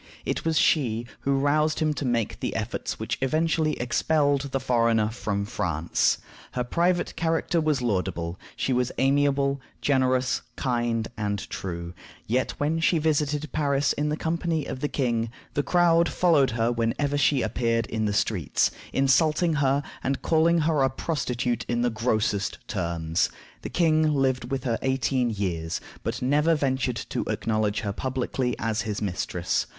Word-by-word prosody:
It -, -, -2 dB
was 160 Hz, -1 st, +1 dB
she 120 Hz, -8 st, +2 dB
who 140 Hz, 0 st, +1 dB
roused 150 Hz, +3 st, +2 dB
him 155 Hz, -1 st, +1 dB
to 145 Hz, -, -4 dB
make 120 Hz, -3 st, -1 dB
the -, -, -3 dB
efforts -, -, -3 dB
which -, -, -3 dB
eventually 155 Hz, +2 st, +1 dB
expelled 140 Hz, +2 st, +1 dB
the 135 Hz, -, -1 dB
foreigner 115 Hz, -4 st, +2 dB
from 105 Hz, -3 st, -2 dB
France. 80 Hz, -5 st, 0 dB, 0.4 s
Her 125 Hz, -, -1 dB
private 175 Hz, +7 st, 0 dB
character 165 Hz, 0 st, 0 dB
was 150 Hz, -5 st, +1 dB
laudable: 90 Hz, -5 st, -1 dB, 0.2 s
she 130 Hz, -, 0 dB
was 125 Hz, 0 st, +1 dB
amiable, 140 Hz, 0 st, +2 dB, 0.2 s
generous, 130 Hz, -2 st, +2 dB
kind, 120 Hz, -3 st, 0 dB
and 105 Hz, -2 st, -2 dB
true; 85 Hz, -2 st, -5 dB, 0.3 s
yet 125 Hz, +4 st, 0 dB
when 155 Hz, +3 st, 0 dB
she 165 Hz, +1 st, +3 dB
visited 150 Hz, -1 st, 0 dB
Paris 140 Hz, -2 st, +1 dB
in 150 Hz, +1 st, -1 dB
company 160 Hz, -1 st, -1 dB
with 130 Hz, -, -5 dB
the 145 Hz, -, +1 dB
king, 120 Hz, -5 st, 0 dB, 0.2 s
the 145 Hz, -, +1 dB
crowd 170 Hz, +1 st, +3 dB
followed 155 Hz, -7 st, +3 dB
her 115 Hz, +1 st, +2 dB
whenever 120 Hz, +5 st, 0 dB
she 145 Hz, -2 st, +3 dB
appeared 115 Hz, +1 st, 0 dB
in 110 Hz, -1 st, -2 dB
the 105 Hz, -, +1 dB
streets, 100 Hz, -7 st, +1 dB, 0.2 s
insulting 155 Hz, +5 st, +3 dB
her, 140 Hz, +1 st, +2 dB, 0.2 s
and 135 Hz, 0 st, -1 dB
calling 165 Hz, +1 st, +3 dB
her 155 Hz, -2 st, +2 dB
a 135 Hz, -, +4 dB
prostitute 125 Hz, -4 st, -2 dB
in 120 Hz, 0 st, 0 dB
the 120 Hz, -, +2 dB
grossest 110 Hz, -3 st, 0 dB
terms. 85 Hz, -3 st, -1 dB, 0.3 s
The -, -, -5 dB
king 155 Hz, -2 st, +3 dB
lived 130 Hz, -3 st, 0 dB
with 135 Hz, -2 st, -2 dB
her 115 Hz, -3 st, -1 dB
eighteen 130 Hz, -1 st, +1 dB
years, 90 Hz, -6 st, -2 dB, 0.2 s
but -, -, -3 dB
never 150 Hz, +5 st, +3 dB
ventured 130 Hz, -4 st, 0 dB
to -, -, -1 dB
acknowledge 110 Hz, -2 st, 0 dB
her 100 Hz, -2 st, -3 dB
publicly 130 Hz, 0 st, -2 dB
as 110 Hz, -2 st, -1 dB
his 105 Hz, -3 st, -3 dB
mistress. 90 Hz, -2 st, -1 dB
130 Hz, 155 wpm, -26 LUFS, 115-150 Hz, 0.4 s, a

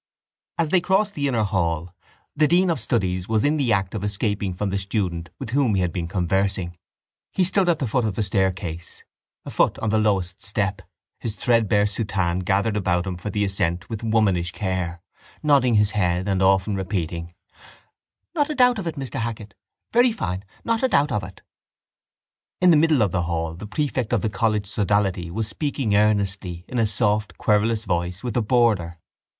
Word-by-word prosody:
As 165 Hz, -2 st, +1 dB
they 180 Hz, +1 st, +3 dB
crossed 200 Hz, +3 st, +1 dB
the 145 Hz, -5 st, -1 dB
inner 120 Hz, -5 st, +1 dB
hall, 85 Hz, -4 st, -1 dB, 0.4 s
the 150 Hz, 0 st, +4 dB
dean 180 Hz, +3 st, +3 dB
of 160 Hz, -, -1 dB
studies 95 Hz, -6 st, -1 dB
was 110 Hz, +1 st, +2 dB
in 150 Hz, +2 st, +2 dB
the 135 Hz, -5 st, +1 dB
act 95 Hz, -3 st, +1 dB
of 105 Hz, -3 st, -4 dB
escaping 100 Hz, -1 st, -1 dB
from 95 Hz, +2 st, -3 dB
the 100 Hz, -, 0 dB
student 95 Hz, -4 st, -2 dB
with 110 Hz, -, -6 dB
whom 130 Hz, -5 st, +2 dB
he 95 Hz, -, +2 dB
had 90 Hz, -3 st, -1 dB
been 85 Hz, -2 st, -3 dB
conversing. 95 Hz, 0 st, 0 dB, 0.6 s
He 190 Hz, -, +1 dB
stood 185 Hz, 0 st, +2 dB
at 170 Hz, -, +3 dB
the 140 Hz, -, -2 dB
foot 125 Hz, +2 st, 0 dB
of 105 Hz, -4 st, -2 dB
the 110 Hz, -, 0 dB
staircase, 95 Hz, -4 st, -2 dB, 0.4 s
a -, -, -6 dB
foot -, -, +2 dB
on 110 Hz, -, -1 dB
the 110 Hz, -, +3 dB
lowest 95 Hz, -4 st, 0 dB
step, 100 Hz, -1 st, -2 dB, 0.4 s
his 110 Hz, -2 st, -4 dB
threadbare 110 Hz, -4 st, +2 dB
soutane 95 Hz, -4 st, -1 dB
gathered 100 Hz, +4 st, +1 dB
about 90 Hz, -3 st, 0 dB
him 95 Hz, -1 st, -3 dB
for 90 Hz, +4 st, -6 dB
the 105 Hz, +1 st, 0 dB
ascent 95 Hz, -1 st, -2 dB
with 110 Hz, 0 st, -4 dB
womanish 100 Hz, -6 st, +1 dB
care, 90 Hz, -3 st, -3 dB, 0.4 s
nodding 135 Hz, -6 st, +4 dB
his 105 Hz, 0 st, +3 dB
head 90 Hz, -2 st, 0 dB
often 95 Hz, +2 st, +3 dB
and 100 Hz, -, -1 dB
repeating: 85 Hz, -3 st, -3 dB, 1.0 s
—Not 300 Hz, -3 st, +1 dB
a 305 Hz, -, -2 dB
doubt 250 Hz, -3 st, +4 dB
of 185 Hz, -, -4 dB
it, 165 Hz, -, -3 dB
Mr 135 Hz, -3 st, -5 dB
Hackett! 110 Hz, -3 st, -5 dB, 0.4 s
Very 240 Hz, +1 st, +5 dB
fine! 95 Hz, -, -3 dB, 0.2 s
Not 230 Hz, -1 st, 0 dB
a 260 Hz, -, +3 dB
doubt 145 Hz, -, +2 dB
of 105 Hz, -, 0 dB
it! 90 Hz, +1 st, -11 dB, 1.2 s
In 180 Hz, -1 st, +6 dB
the -, -, +6 dB
middle 150 Hz, -5 st, +4 dB
of 100 Hz, -, 0 dB
the 90 Hz, -, 0 dB
hall 80 Hz, -1 st, -2 dB
the 95 Hz, +6 st, -8 dB
prefect 130 Hz, -1 st, -2 dB
of 115 Hz, -, +2 dB
the 110 Hz, -, 0 dB
college 105 Hz, 0 st, 0 dB
sodality 100 Hz, -3 st, 0 dB
was 110 Hz, +5 st, -3 dB
speaking 130 Hz, -2 st, -1 dB
earnestly, 100 Hz, -4 st, 0 dB
in 125 Hz, -, -2 dB
a 115 Hz, -, +3 dB
soft 105 Hz, +1 st, 0 dB
querulous 110 Hz, +1 st, +1 dB
voice, 90 Hz, +1 st, -2 dB
with 120 Hz, -4 st, -3 dB
a 120 Hz, -, +3 dB
boarder. 105 Hz, -7 st, +2 dB
105 Hz, 190 wpm, -23 LUFS, 95-120 Hz, 1.2 s, In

